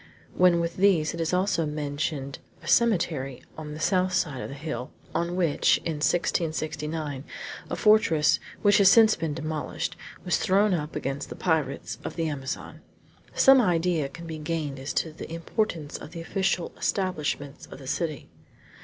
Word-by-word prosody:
When 180 -1 +5
with 170 0 -2
these 185 -5 +3
is 165 -1 -1
also 180 -3 +1
mentioned 145 -2 -3 0.2
a - - -10
cemetery 165 - +1
on 150 -1 -7
the - - -8
south 185 +2 +2
side 145 -8 0
of - - -5
a 140 - -7
hill, 140 -3 -5 0.2
on 170 +1 -1
which, 170 -5 +3
in 160 -2 -1
1669, 155 -3 -1 0.5
a - - -2
fortress, 210 -9 +4 0.2
which 205 -1 +5
has 195 -2 +7
since 220 +1 +7
been 160 -3 -3
demolished, 155 -1 -3 0.3
was 175 - +2
thrown 200 0 +3
up 150 -2 -3
against 135 +1 -3
the - - -7
pirates 160 -6 -1
of - - -5
the 165 -1 -1
Amazon, 145 +1 -5 0.5
some 270 -1 +7
idea 170 - +1
can 170 +4 -10
be 160 -1 -6
gained 150 -3 -3
as 135 +2 -4
to 160 - -1
the 160 - -9
importance 165 -2 -2
of 150 - -10
the 165 - -6
official 185 0 -1
establishments 150 -7 -2
of - - -10
the 135 - -12
city. 155 +2 -3
160 Hz, 160 wpm, -26 LUFS, 150-180 Hz, 0.5 s, has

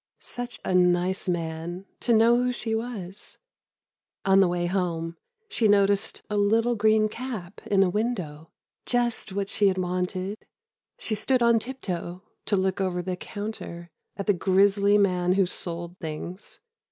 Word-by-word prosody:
Such 245 0 -6
a - - 0
nice 180 +1 +2
man, 170 +2 -3
to 240 - 0
know 230 +1 +6
who 250 0 +1
she 225 -2 -3
was. 215 -5 -5 0.9
On 195 0 +5
the 195 - +6
way 175 0 -1
home, 170 -2 -1 0.3
she 245 - +1
noticed 200 +1 +2
a 210 - -2
little 225 +4 +3
green 215 0 +4
cap 215 -6 -7
in 195 -1 +4
a 185 - +2
window—just 215 +4 -3
what 200 0 -2
she 205 0 +2
had 190 -1 +1
wanted.... 185 +2 -2 0.6
She 220 - -4
stood 240 +4 +1
on 235 -1 +5
tiptoe, 185 -8 -5 0.2
to 205 - +2
look 190 +1 0
over 180 -2 -1
the 185 0 -2
counter, 180 -4 -7 0.3
at 200 - -3
the 205 - +4
grisly 200 +3 +3
man 180 -3 +2
who 195 0 +3
sold 175 0 -5
things. 165 +4 -7
195 Hz, 150 wpm, -26 LUFS, 180-220 Hz, 0.9 s, know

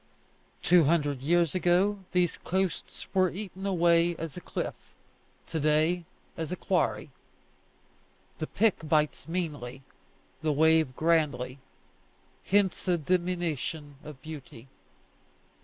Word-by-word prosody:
Two 175 -3 +6
hundred 145 -4 +1
years 170 +2 +2
ago 185 +3 +2
these 180 -2 +1
coasts 190 -2 -2
were 185 -1 +4
eaten 195 0 -6
away 170 -2 +3
as 165 -3 -6
a 180 - -7
cliff; - - -3 0.7
to 160 - -3
day, 155 +4 +2 0.3
as 165 0 -4
a - - -1
quarry. 180 -5 0 1.3
The 155 - -2
pick 195 -7 +1
bites 155 0 +1
meanly, 145 -7 -4 0.6
the 155 - +1
wave 160 -2 +3
grandly; 150 -5 +1 0.8
hence 195 -2 +1
a 180 -1 +3
diminution 165 -4 -2
of 150 -3 -10
beauty. 140 -6 -9
165 Hz, 110 wpm, -29 LUFS, 150-180 Hz, 1.3 s, Two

